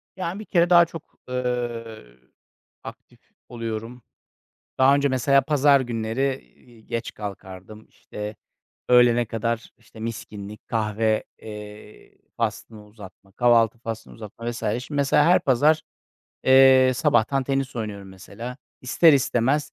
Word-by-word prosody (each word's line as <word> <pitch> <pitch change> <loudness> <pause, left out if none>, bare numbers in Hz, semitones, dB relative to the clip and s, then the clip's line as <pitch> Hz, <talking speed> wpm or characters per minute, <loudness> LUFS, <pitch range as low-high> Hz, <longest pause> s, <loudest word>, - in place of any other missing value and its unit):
Yani, 185 +1 -4
bir 215 - -8
kere 175 -3 +2
daha 170 -1 +7
çok, 165 -1 -10 0.3
ııı, 120 - -4 0.6
aktif - - -12 0.3
oluyorum. 115 +1 -6 0.8
Daha 130 +1 +5
önce 140 0 +2
mesela 135 +1 +3
pazar 145 -1 +3
günleri, 120 +3 -2 0.2
iii, 115 -3 -21
geç 115 0 -4
kalkardım. 100 +1 -9
İşte, 105 0 -8 0.5
öğlene 120 -1 +5
kadar, 115 +1 -3
işte, 110 -1 -16
miskinlik, 105 -2 -8
kahve, 110 0 0 0.2
eee, 105 0 -11 0.2
faslını 110 -2 -4
uzatma, 100 -2 -15
kahvaltı 120 0 +3
faslını 115 -1 -7
uzatma 115 +2 -7
vs. 120 - -7
Şimdi 125 +7 -3
mesela 140 +1 +3
her 175 +2 +5
pazar, 150 +4 +2 0.6
eee, 130 -1 +6
sabahtan 135 -1 +1
tenis 135 -1 -2
oynuyorum 105 -3 -6
mesela. 115 +6 -9 0.2
İster 155 +5 +4
istemez 135 +2 +1
120 Hz, 120 wpm, -23 LUFS, 110-135 Hz, 0.8 s, daha